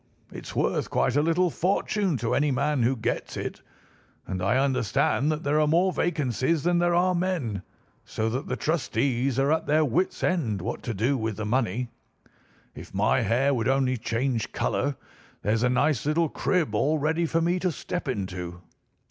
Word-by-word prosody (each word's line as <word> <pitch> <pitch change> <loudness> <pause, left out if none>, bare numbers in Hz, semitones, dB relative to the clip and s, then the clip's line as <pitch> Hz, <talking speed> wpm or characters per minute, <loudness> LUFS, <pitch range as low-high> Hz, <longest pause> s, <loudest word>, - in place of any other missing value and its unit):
It's - - -9
worth - - 0
quite 125 - +1
a 145 - +4
little 165 +3 +2
fortune 190 -1 0
to 115 -1 -1
any 150 +1 +2
man 140 +1 +1
who 125 +3 +2
gets 115 - -3
it, - - -5 0.6
and 95 -1 -4
I 100 +7 +2
understand 135 +2 +1
that 155 +1 -3
there 145 +2 +2
are 150 - +3
more 175 +4 +3
vacancies 145 -2 0
than 175 0 +2
there 175 0 +2
are 180 +1 +3
men, 170 - -1 0.4
so 110 - -2
that 130 +4 -3
the - - -1
trustees 135 -5 0
are 135 +2 +2
at 160 - 0
their 155 +1 +3
wits' 170 +8 -1
end 130 - 0
what 90 - -4
to 120 - -4
do 120 +8 +1
with 110 -2 -2
the 110 - -3
money. 120 0 0 0.8
If - - -11
my 105 +6 +2
hair 125 +6 +2
would 115 -4 0
only 130 -1 +2
change 120 0 -1
colour, 140 0 -1 0.5
here's 110 +2 +1
a 125 - +3
nice 135 -1 +2
little 160 +1 +2
crib 170 - 0
all 145 +9 +2
ready 160 +3 0
for 165 - +1
me 175 +2 +1
to 180 0 0
step 175 +2 -5
into. 90 -7 -4
140 Hz, 180 wpm, -26 LUFS, 115-165 Hz, 0.8 s, a